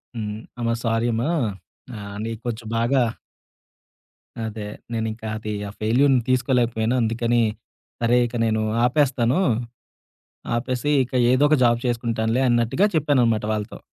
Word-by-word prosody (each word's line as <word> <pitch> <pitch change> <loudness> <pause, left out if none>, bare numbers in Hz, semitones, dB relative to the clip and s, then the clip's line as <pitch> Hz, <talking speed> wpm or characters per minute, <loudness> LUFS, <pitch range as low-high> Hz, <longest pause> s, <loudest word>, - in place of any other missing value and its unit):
హ్మ్. 105 -2 -4 0.2
"అమ్మ 115 -1 -1
సారీ 115 0 +1
అమ్మ. 115 +1 -1 0.7
ఆహ్, 100 -1 -8
నేను 115 -1 -4
కొంచెం 115 -1 -4
బాగా" 125 +3 +2 1.4
అదే. 110 -1 -5 0.3
"నేనింక 110 0 -3 0.2
అది 110 0 -5 0.2
ఆ - - -8
ఫెయిల్యూర్‌ని 125 +4 +3
తీసుకోలేకపోయాను. 125 -2 +1
అందుకని 115 +1 +1 0.6
సరే, 120 +1 +3
ఇక 120 - -9
నేను 110 -1 +1 0.2
ఆపేస్తాను. 130 0 +2 1.2
ఆపేసి 125 +4 -1
ఇక 125 - -15 0.2
ఏదో 130 +3 +4
ఒక 155 - +4
జాబ్ 120 -1 +4
చేసుకుంటానులే" 115 0 0
అన్నట్టుగా 120 - +2
చెప్పాననమాట 125 -8 +2
వాళ్ళతో. 105 -1 -4
115 Hz, 120 wpm, -23 LUFS, 110-125 Hz, 1.4 s, ఏదో